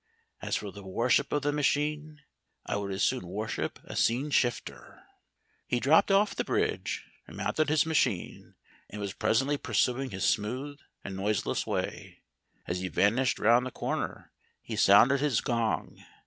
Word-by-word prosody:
As - - -2
for 105 -2 -4
the 100 - -11
worship 115 +8 +1
of 145 -1 0
the 145 - +1
machine, 150 +1 -1 0.4
I - - -2
would 100 -1 -3
as 95 0 -1
soon 125 -9 0
worship 105 +4 -3
a - - -9
scene 130 +6 +1
shifter." 70 - -2 0.6
He 125 - 0
dropped 150 +10 +4
off 200 +2 +3
the - - -1
bridge - - -1 0.2
and - - -11
mounted 155 -1 0
his 155 +1 +3
machine, 155 - -1 0.3
and 105 - -8
was 100 -2 -4
presently 135 +6 +1
pursuing 125 +2 0
his 95 -3 -3
smooth 130 +7 -1 0.2
and 95 - -6
noiseless 100 +1 -1
way. - - -4 0.4
As 90 +1 -3
he 95 - -3
vanished 115 +9 +2
round 120 +3 +4
the 130 - -4
corner - - -4 0.3
he - - -5
sounded 120 +8 +6
his 145 -2 +1
gong. 115 -3 -2
120 Hz, 160 wpm, -29 LUFS, 100-145 Hz, 0.6 s, sounded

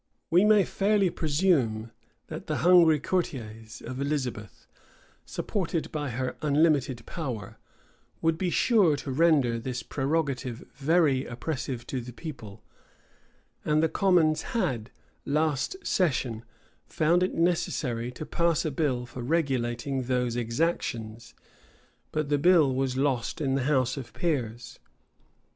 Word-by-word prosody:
We 180 +5 +5
may 210 -2 +6
fairly 200 -2 +2
presume, 145 - +1 0.3
that - - -8
the - - -1
hungry 170 -4 +6
courtiers 115 -10 -4
of 130 +3 -5
Elizabeth, 130 -7 -3 0.6
supported 170 -5 -2
by 150 -2 -3
her 125 +2 -3
unlimited 145 -5 +2
power, 125 - -6 0.6
would 165 0 +2
be 180 +2 -1
sure 195 -5 +4
to 140 -1 -5
render 140 -6 +3
this 125 0 -4
prerogative 135 -3 -2
very 145 -2 +2
oppressive 120 0 -4
to 130 - -3
the 120 +1 -9
people; 115 - -9 1.0
and 155 +1 +2
the 160 - +3
commons 165 -5 +3 0.2
had, 130 - -1 0.3
last 150 - 0
session, 130 - 0 0.4
found 170 +3 +2
it 185 - 0
necessary 135 -8 0
to 155 - -7
pass 170 -1 +1
a 155 - 0
bill 130 -4 -1
for 125 +1 -8
regulating 135 -2 -1
these 125 -2 0
exactions: 115 -3 -2 0.8
but 155 -2 -2
the 145 -1 +2
bill 160 -4 +5
was 130 0 -1
lost 135 -4 0
in 135 -3 0
the 135 -2 0
house 130 -2 +1
of 130 -4 -7
peers. 125 - -3
140 Hz, 125 wpm, -27 LUFS, 125-165 Hz, 1.0 s, may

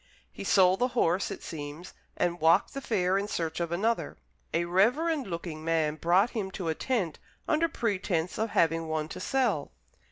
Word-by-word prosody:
He - - -8
sold 185 -1 +4
the 250 - +3
horse, 180 -1 +2
it - - -7
seems, 155 +3 -7 0.2
and 175 0 0
walked 165 +5 +4
the 275 - -4
fair 190 -5 +1
in 200 - -3
search 165 -5 -3
of 170 -1 -2
another. 220 +7 -1 0.3
A 170 +1 +1
reverend 250 - +2
looking 170 -3 -5
man 160 -2 +1
brought 175 +8 +2
him 210 -5 -3
to 175 -5 -2
a - - +2
tent, 190 - -2 0.3
under 330 +1 +2
pretence 190 - -1
of 220 +1 0
having 165 -2 +2
one 155 -1 -2
to - - -7
sell. 235 - 0
180 Hz, 180 wpm, -29 LUFS, 165-220 Hz, 0.3 s, sold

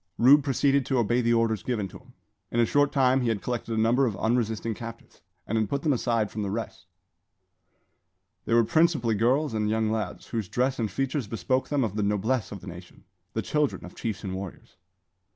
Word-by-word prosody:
Rube 140 +4 +6
proceeded 140 0 +2
to 135 - +1
obey 120 +1 +2
the 120 0 +2
orders 115 -3 +1
given 110 -6 -2
him. - - -15 0.4
In 120 - -1
a 120 - +5
short 145 +4 +2
time 130 -1 +3
he 125 - 0
had 110 -3 0
collected 115 -2 -3
a - - +2
number 120 +4 +3
of 105 -5 -3
unresisting 115 -1 0
captives, 115 -3 -10 0.2
and 110 +1 0
had 110 -2 0
put 140 0 -2
them 150 - +3
aside 115 -4 0
from 110 - -4
the 100 - -2
rest. 110 +3 -5 1.6
They 115 - +2
were 115 - +6
principally 155 -4 +2
girls 125 +6 +1
and 105 -1 0
young 110 0 +1
lads, 110 -5 -4
whose 110 -6 -3
dress 130 +1 0
and 110 -2 0
features 135 -1 -2
bespoke 130 +4 -1
them 145 -2 +1
of 105 -3 -2
the 105 - 0
noblesse 105 +4 0
of 100 -3 -7
the - - -11
nation, 90 0 -11 0.3
the 110 - -2
children 150 -9 -1
of 90 - -11
chiefs 110 -5 -4
and 95 -2 -4
warriors. 95 -1 -8
115 Hz, 205 wpm, -27 LUFS, 110-130 Hz, 1.6 s, Rube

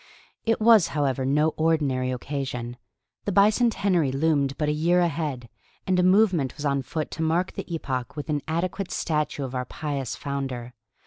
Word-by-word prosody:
It 225 - +2
was, 220 -5 +6
however, 135 -2 0
no 150 +3 +3
ordinary 145 -6 +1
occasion. 125 -2 -4 0.5
The 205 - 0
bicentenary 200 - +3
loomed 140 -1 +1
but 150 - 0
a - - +2
year 170 +4 +2
ahead, 150 -7 -1 0.4
and 185 -1 +2
a - - +5
movement 185 - +3
was 150 - -5
on 140 -1 +1
foot 155 +4 -4
to 165 - -5
mark 165 +3 +1
the - - -7
epoch 130 -6 -3
with 150 - -5
an 150 -2 -1
adequate 175 +3 -2
statue 150 -3 -1
of 130 -1 -5
our 125 0 -2
pious 140 -2 -4
founder. 135 -4 -4
150 Hz, 170 wpm, -25 LUFS, 135-175 Hz, 0.5 s, was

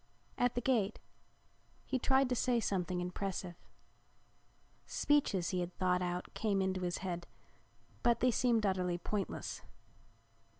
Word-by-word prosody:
At 245 -1 +1
the 245 - 0
gate 225 -5 +1 0.9
he 260 - -1
tried 265 +1 +4
to 250 - +1
say 245 0 +2
something 185 -4 -1
impressive. 180 0 -3 1.3
Speeches 245 -12 +2
he 185 - 0
had 175 0 -4
thought 180 -1 +2
out 180 0 -3
came 210 -3 0
into 190 -1 0
his 175 -1 -1
head, 175 -2 -3 0.7
but 235 -1 +3
they 250 - +4
seemed 230 -2 +2
utterly 180 -2 +1
pointless. 200 +3 -3
195 Hz, 130 wpm, -35 LUFS, 180-240 Hz, 1.3 s, tried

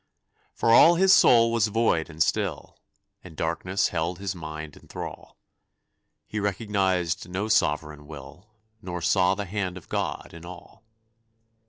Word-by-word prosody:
For 115 - +1
all 170 +8 +7
his 190 +2 +5
soul 115 -8 +6
was 115 -2 +2
void 105 -7 0
and 80 0 +1
still, - - -3 0.4
And 80 -4 -13
darkness 90 +4 -1
held 85 +1 -2
his 95 0 -4
mind 80 -3 -8
in - - -18
thrall; - - -9 0.9
He 105 - -5
recognized 95 -5 -1
no 95 +4 -3
Sovereign 75 -7 0
Will, 75 +7 -12 0.3
Nor 90 -4 -6
saw 95 0 +3
the 100 - -4
hand 95 -1 -3
of 90 - -14
God - - -3
in 85 0 -11
all. 90 +5 -12
90 Hz, 145 wpm, -25 LUFS, 80-105 Hz, 0.9 s, all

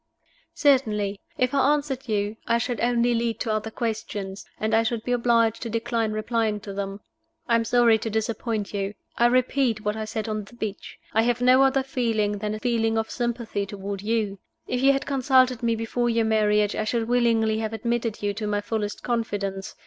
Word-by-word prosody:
"Certainly. 210 -8 +2 0.2
If 255 +1 +1
I 280 +1 +4
answered 270 -3 -4
you, 205 0 0
I 235 - +3
should 240 -1 -2
only 240 0 +2
lead 230 -1 -1
to 225 - -1
other 215 +1 -2
questions, 210 -4 -4
and 220 +1 -1
I 225 - +5
should 225 0 -2
be 245 - -3
obliged 230 -2 +2
to 230 - -4
decline 230 -1 -1
replying 215 0 0
to 200 -1 -7
them. 195 0 -4 0.5
I 240 - +1
am 230 0 +4
sorry 235 -1 +4
to 225 - -3
disappoint 220 -1 -2
you. 200 0 -2 0.2
I 240 - +6
repeat 255 -2 +2
what 210 0 0
I 220 0 -3
said 220 +1 -4
on 215 -1 -3
the 240 - -16
beach 215 -4 -6 0.2
I 225 - +4
have 240 +1 +1
no 255 +1 +5
other 270 0 +3
feeling 225 -6 0
than 210 0 -2
a - - -6
feeling 225 -2 +1
of 220 0 -1
sympathy 235 -4 -2
toward 200 0 -5
you. 210 -2 -1 0.3
If 250 - -2
you 275 +1 +6
had 275 0 -1
consulted 260 -2 +3
me 230 -1 +1
before 235 +2 -1
your 230 -1 +2
marriage, 210 -1 +2
I - - -1
should 225 +1 -1
willingly 230 -3 +2
have 220 -1 -2
admitted 230 -1 -2
you 205 0 0
to 210 +1 -4
my 205 0 0
fullest 205 0 -3
confidence. 205 -5 -2
225 Hz, 200 wpm, -25 LUFS, 210-240 Hz, 0.5 s, I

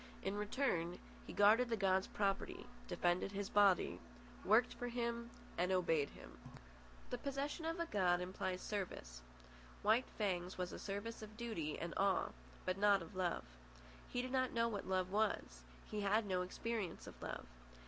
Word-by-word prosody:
In 195 +1 -1
return, 205 -5 0 0.3
he - - -5
guarded 220 +4 +6
the 230 - +1
god's 190 -1 +3
property, 195 -1 -1 0.2
defended 175 +2 +1
his 200 0 -2
body, 200 -3 +4 0.4
worked 220 +5 +5
for 245 - -4
him, 235 -1 -2 0.3
and 180 +1 +2
obeyed 165 -6 +2
him. - - -13 0.7
The 245 - -2
possession 280 +4 -2
of 330 +1 -1
a 335 - +1
god 185 - +3
implies 185 0 -2
service. 120 - -4 0.6
White 220 +5 +4
Fang's 185 -4 -1
was 180 -1 -2
a - - -6
service 205 +3 -4
of 215 0 -9
duty 215 -11 -2
and 170 0 -4
awe, 195 -1 +3 0.4
but 185 +1 0
not 200 -3 +5
of 175 +4 -12
love. 180 -2 0 0.7
He 245 - -1
did 255 - -4
not 260 -1 +1
know 230 0 +3
what 205 -4 -3
love 185 -1 +1
was. 205 - 0 0.3
He 210 - -1
had 210 +2 +3
no 185 -2 +1
experience 200 0 -3
of - - -11
love. - - -4
200 Hz, 165 wpm, -39 LUFS, 180-230 Hz, 0.7 s, guarded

